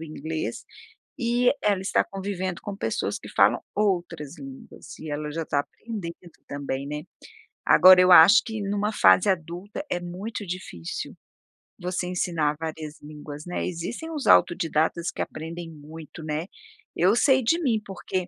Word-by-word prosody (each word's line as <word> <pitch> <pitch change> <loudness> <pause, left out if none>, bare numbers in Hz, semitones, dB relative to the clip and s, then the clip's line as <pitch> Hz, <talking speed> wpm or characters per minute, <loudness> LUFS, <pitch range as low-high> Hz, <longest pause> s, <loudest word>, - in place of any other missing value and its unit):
o - - -6
inglês 155 0 -5 0.5
e 240 0 +2
ela 200 -2 +2
está 195 - +2
convivendo 190 -2 -4
com 205 - -5
pessoas - - -2
que - - -11
falam - - +4 0.2
outras 175 -7 -1
línguas, 135 -2 -11
e 155 - -7
ela 150 +1 -3
já 165 +2 -2
está 145 - 0
aprendendo 175 -1 -8 0.2
também, 140 -1 -4
né. 150 +2 -5 0.6
Agora 185 0 +8
eu 185 0 +6
acho 175 +7 +9
que 220 -2 -5
em 200 0 -2
uma 210 +1 0
fase 205 -2 +5
adulta 180 - -4
é 175 - -1
muito 190 +5 -6
difícil 175 - -6 0.7
você 180 0 -2
ensinar 165 -4 0
várias 160 -1 -6
línguas, 150 0 -9
né, 175 - -3
existem 215 - -5
os 300 -4 -4
autodidatas 165 0 +3
que - - -3
aprendem 165 +2 -7
muito, 155 +1 -11
né. 155 +2 -3 0.5
Eu 190 +6 +4
sei 265 +1 +4
de 330 +9 +2
mim, 235 -7 +1
porque, 190 -1 -3
175 Hz, 155 wpm, -25 LUFS, 155-200 Hz, 0.7 s, acho